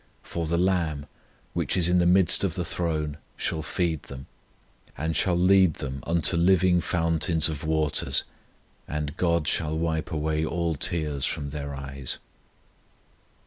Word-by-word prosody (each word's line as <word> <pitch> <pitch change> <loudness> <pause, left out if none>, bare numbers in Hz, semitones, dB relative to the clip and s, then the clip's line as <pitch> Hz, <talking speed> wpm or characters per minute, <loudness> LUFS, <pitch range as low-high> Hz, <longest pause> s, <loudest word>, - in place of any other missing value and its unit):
For 85 -1 -4
the 85 +2 +1
LAMB, 85 -5 0 0.5
which - - 0
is 85 -2 +4
in 90 0 +3
the 85 - +3
midst 90 +1 +4
of 95 -3 0
the 90 -3 -2
throne, 80 -4 -2 0.2
shall 80 - -2
feed 80 -2 -1
them, 65 0 -10 0.7
and 80 +3 -2
shall 90 -4 +2
lead 95 -2 +5
them 70 -2 -6
unto 85 +1 +3
living 90 0 +4
fountains 85 -2 +1
of 75 -3 -5
waters; 80 -2 +1 0.6
and 75 0 -3
GOD 85 -4 +1
shall 80 -1 0
wipe 80 +1 -1
away 80 0 -1
all 85 +1 -1
tears 75 -2 -2
from 70 -1 -3
their 70 -1 -5
eyes." 70 -1 -4
80 Hz, 145 wpm, -26 LUFS, 75-85 Hz, 0.7 s, lead